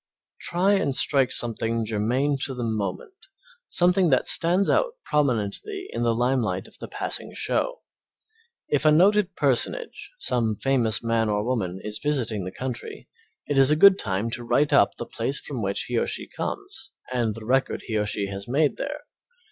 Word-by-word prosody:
Try 185 +4 +2
and 145 -9 +1
strike 135 -3 +3
something 115 -1 0
germane 125 +7 0
to 135 - -5
the 125 - -4
moment, 110 - -3 0.6
something 180 0 +3
that 130 - +2
stands 180 +4 +3
out - - +1
prominently 145 - -1
in - - -3
the 115 -1 +1
limelight 120 -6 0
of - - -14
the - - -7
passing - - -5
show. - - -1 0.8
If 145 -1 0
a 155 - +5
noted 195 +3 +3
personage, 145 - 0
some 115 - 0
famous 120 -2 +1
man 115 -1 +1
or 105 0 0
woman, 95 -8 -2
is 105 0 -4
visiting 120 -9 -1
the 95 - -5
country, 125 +2 -7 0.4
it 145 -2 +1
is 135 0 +6
a 150 - +4
good 195 +4 +7
time 100 +2 -1
to 120 +1 -4
write 145 +5 +1
up - - +4
the - - -5
place - - -2
from - - -6
which - - -1
he - - -1
or - - -1
she - - -4
comes 390 - -6 0.2
and 115 -4 0
the 115 -1 -9
record 130 +3 0
he 110 - -4
or 105 - -1
she 105 -1 -1
has 100 0 -7
made 145 +4 +1
there. 295 +1 -5
130 Hz, 180 wpm, -24 LUFS, 110-160 Hz, 0.8 s, good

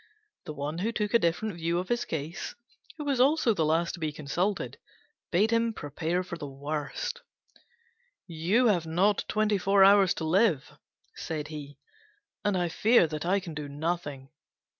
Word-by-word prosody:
The 155 - -5
one 150 +3 -4
who 215 +5 0
took 210 -3 -2
a 235 - +6
different 185 +4 0
view 170 0 -1
of 180 +1 -3
his 240 0 0
case, 160 +2 -5 0.4
who 300 - -5
was 275 -3 0
also 270 -2 +4
the 165 - 0
last 165 +2 +1
to 175 - -8
be 155 -2 -2
consulted, 170 +7 -2 0.5
bade 205 +6 +2
him 230 0 +2
prepare 165 +4 -2
for 170 -2 -7
the 145 - -5
worst: 150 - -4 1.0
"You 175 +9 +1
have 180 -8 +2
not 190 +6 +2
twenty 215 -1 +1
four 195 +1 +4
hours 195 -1 +6
to - - -4
live," 170 - +2 0.4
said 155 -2 -5
he, 145 -2 -8 0.7
"and 205 -2 +1
I 175 -1 +1
fear 205 +3 +4 0.2
I 190 +3 +2
can 175 -4 -8
do 150 -1 -6
nothing." 145 -3 -3
175 Hz, 165 wpm, -28 LUFS, 155-210 Hz, 1.0 s, a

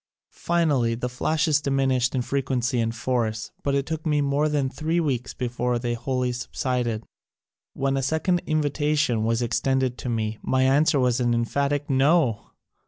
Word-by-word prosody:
Finally 145 -9 +2
the 125 +2 -3
flashes 150 +4 +1
diminished 135 -2 +1
in 125 - 0
frequency 130 -2 -1
and 115 0 -1
force 115 -2 -2
but 140 -1 0
it 140 -1 0
took 160 0 -4
more 150 -1 +1
than 145 -3 0
three 160 +5 -1
weeks 130 -7 -2
before 125 0 -1
they 120 0 -2
wholly 125 +1 -1
subsided. 125 -2 -2 0.7
When 135 0 0
a 135 - 0
second 160 +6 0
invita 150 -1 0
tion 120 -7 +1
was 115 +1 +1
extended 125 +2 0
to 125 - -4
me 110 -2 -2
my 130 0 +1
answer 140 +2 +3
was 125 -1 +2
an 120 -1 +2
emphatic 140 +5 0
NO 135 -4 +2
130 Hz, 160 wpm, -24 LUFS, 120-145 Hz, 0.7 s, answer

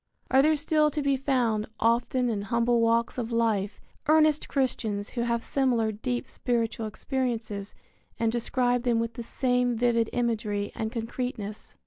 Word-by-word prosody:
Are 265 +1 +6
there 310 +2 +4
still 305 0 +2
to 300 +1 -2
be 280 -1 +2
found, 245 -6 0
often 240 +2 +2
in 215 -4 -1
humble 235 +3 +1
walks 230 +2 +2
of 235 -1 -3
life, 215 -3 0 0.3
earnest 310 -1 +4
Christians 225 -7 -1
who 240 - -3
have 235 0 0
similar 245 -5 +1
deep 240 +3 -3
spiritual 230 -2 -2
experiences 225 -4 -3 0.4
and 230 -1 +1
describe 245 +1 +1
them 240 -2 +1
with 230 0 -2
the 235 - -6
same 245 0 0
vivid 230 -1 +2
imagery 215 -4 -1
and 220 0 -3
concreteness? 230 -3 -4
235 Hz, 150 wpm, -27 LUFS, 225-255 Hz, 0.4 s, Are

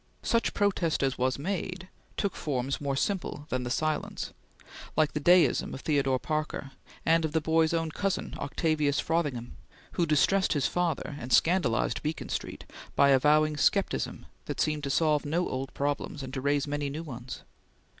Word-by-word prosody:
Such 230 -1 +1
protest 185 -7 +1
as 135 -2 0
was 130 +1 +1
made 185 +3 -3 0.3
took 200 -3 -1
forms 135 -2 -2
more 140 -1 -1
simple 175 -2 -2
than 130 - -1
the 125 - -4
silence, 155 +4 -2 0.6
like 155 -2 +3
the 150 - -1
deism 175 +4 +4
of 135 - -8
Theodore 135 -4 +2
Parker, 155 -1 -3 0.3
and 165 0 +4
of 155 -1 -2
the 160 - +3
boy's 160 +1 +2
own 165 -1 0
cousin 195 +3 -2
Octavius 150 0 0
Frothingham, 145 -8 -1 0.3
who 170 - 0
distressed 170 +7 +3
his 145 -3 0
father 165 -4 -1
and 125 - -7
scandalized 160 -6 +3
Beacon 155 +1 -3
Street - - -4 0.3
by 140 - +5
avowing 150 +3 +4
scepticism - - +1 0.2
that - - -5
seemed 150 -1 0
to - - -2
solve 150 +1 +2
no 165 +5 0
old 135 +1 -4
problems, 145 0 -2
and 130 0 -7
to 135 - -3
raise 140 0 +1
many 145 0 -2
new 155 +4 -5
ones. 130 -4 -8
150 Hz, 165 wpm, -29 LUFS, 140-165 Hz, 0.6 s, by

